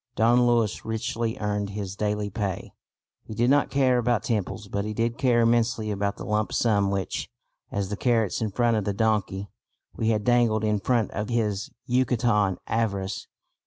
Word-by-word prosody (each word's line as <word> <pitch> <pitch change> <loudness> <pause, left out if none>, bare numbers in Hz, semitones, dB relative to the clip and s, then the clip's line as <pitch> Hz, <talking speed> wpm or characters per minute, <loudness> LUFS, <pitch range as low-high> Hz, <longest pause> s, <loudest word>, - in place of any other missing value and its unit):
Don 120 +2 +4
Luis 115 -3 +1
richly 115 +1 -2
earned 105 -1 -2
his 100 -1 -5
daily 105 0 -1
pay. 100 -2 -4 0.5
He 110 - -9
did 120 +4 +3
not 145 0 +3
care 130 -3 +3
about 120 -1 +1
temples, 105 -2 -2
but 100 0 -2
he 105 0 -4
did 115 +1 -1
care 120 -3 +3
immensely 115 -1 +2
about 100 0 -1
the - - -7
lump 105 0 0
sum 100 -4 +2
which, 95 -1 -3 0.4
as 100 -2 -2
the 105 - -2
carrots 115 -2 +1
in 110 - 0
front 115 +2 +1
of 105 - 0
the 100 - -1
donkey, 100 -2 0 0.4
we 110 - 0
had 105 -2 +1
dangled 120 -3 +3
in 105 -1 +1
front 115 0 +1
of 105 +1 -4
his 110 -4 -1 0.2
Yucatecan 120 -6 +2
avarice. 100 -4 -2
110 Hz, 175 wpm, -26 LUFS, 105-120 Hz, 0.5 s, Don